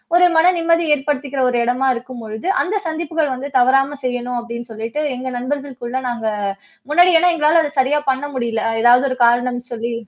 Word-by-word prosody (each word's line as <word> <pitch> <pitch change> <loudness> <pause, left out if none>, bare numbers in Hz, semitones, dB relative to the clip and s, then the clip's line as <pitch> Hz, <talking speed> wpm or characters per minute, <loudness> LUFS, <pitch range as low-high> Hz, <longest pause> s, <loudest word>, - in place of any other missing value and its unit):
ஒரு 360 - +6
மன 325 - +5
நிம்மதி 335 0 +2
ஏற்படுத்திக்கிற 275 -1 -2
ஒரு 245 - 0
இடமா 255 +2 +1
இருக்கும்பொழுது, 235 +1 -7 0.2
அந்த 405 +4 -2
சந்திப்புகள் 320 -3 -2
வந்து 270 +3 -6
தவறாம 270 +3 +2
செய்யணும் 245 -1 -2
அப்டின்னு 235 0 -8
சொல்லிட்டு 230 +8 -4
எங்க 260 +1 -5
நண்பர்களுக்குள்ள 260 -1 -4
நாங்க 230 -2 -3 0.6
முன்னாடியெல்லாம் 350 +1 +4
எங்களால 320 +1 +3
அத 295 - -3
சரியா 290 +3 +2
பண்ண 265 +2 -3
முடியல. 230 -3 -2 0.2
ஏதாவது 245 +3 +5
ஒரு 255 - -3
காரணம் 245 +1 +1
சொல்லி 235 0 -4
260 Hz, 160 wpm, -18 LUFS, 240-300 Hz, 0.6 s, ஒரு